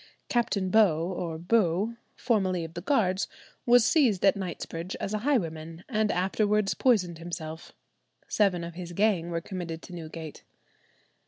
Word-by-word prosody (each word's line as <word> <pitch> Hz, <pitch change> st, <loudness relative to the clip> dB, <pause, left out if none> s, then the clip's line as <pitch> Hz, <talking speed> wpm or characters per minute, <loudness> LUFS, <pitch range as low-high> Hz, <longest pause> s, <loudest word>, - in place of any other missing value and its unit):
Captain 200 Hz, -6 st, 0 dB
Beau, 185 Hz, -7 st, +4 dB
or 170 Hz, -3 st, -4 dB
Bew, 195 Hz, +3 st, +1 dB, 0.2 s
formerly 190 Hz, -8 st, +1 dB
of 165 Hz, 0 st, -7 dB
the 175 Hz, -, -5 dB
Guards, 195 Hz, -5 st, +1 dB, 0.4 s
was 240 Hz, -1 st, +6 dB
seized 240 Hz, -, +3 dB
at 195 Hz, -, +5 dB
Knightsbridge 180 Hz, -1 st, -5 dB
as 200 Hz, -, -4 dB
a 215 Hz, -, 0 dB
highwayman, 165 Hz, -, -1 dB
and 215 Hz, -3 st, +1 dB
afterwards 205 Hz, +2 st, +1 dB
poisoned 185 Hz, -10 st, +2 dB
himself. 165 Hz, -1 st, -7 dB, 0.5 s
Seven 190 Hz, -5 st, +2 dB
of 170 Hz, 0 st, -6 dB
his 175 Hz, 0 st, -7 dB
gang 195 Hz, -3 st, +2 dB
were 170 Hz, -1 st, -2 dB
committed 170 Hz, -3 st, -6 dB
to 180 Hz, -, -10 dB
Newgate. 160 Hz, -2 st, -8 dB
185 Hz, 145 wpm, -28 LUFS, 170-215 Hz, 0.5 s, was